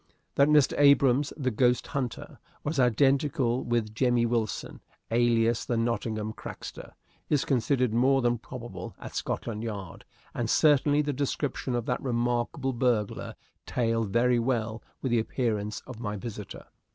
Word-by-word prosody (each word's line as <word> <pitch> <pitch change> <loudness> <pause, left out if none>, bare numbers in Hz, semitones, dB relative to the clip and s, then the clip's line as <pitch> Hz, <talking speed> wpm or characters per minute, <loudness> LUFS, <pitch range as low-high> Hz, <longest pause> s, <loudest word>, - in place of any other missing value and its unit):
That 140 - +4
Mr. 150 -3 +4
Abrahams, 140 -1 +5
the 130 -4 0
ghost 125 +2 +2
hunter, 130 -5 -4 0.2
was 150 -1 -2
identical 130 +1 +2
with 115 -3 -1
Jemmy 120 0 +2
Wilson, 115 -3 -2 0.3
alias 115 -1 +2
the 120 - -1
Nottingham 110 -2 -1
Crackster, - - -9 0.4
is 145 -3 +2
considered 125 -2 +1
more 135 +3 +3
than 120 -1 +1
probable 115 -7 -8
at - - -9
Scotland 110 -2 -3
Yard, 100 -6 -6 0.3
and 120 -2 -2
certainly 145 0 +4
the 145 0 -1
description 140 -1 -2
of 120 -2 -2
that 125 - -1
remarkable 120 +2 -1
burglar 120 -4 -1 0.3
tallied 115 -3 0
very 120 +2 +3
well 115 -2 -1 0.2
with 130 - -1
the 120 - +3
appearance 110 -3 -2
of 130 -4 -10
my 105 -3 -3
visitor. 105 -1 -7
120 Hz, 140 wpm, -28 LUFS, 115-135 Hz, 0.4 s, Abrahams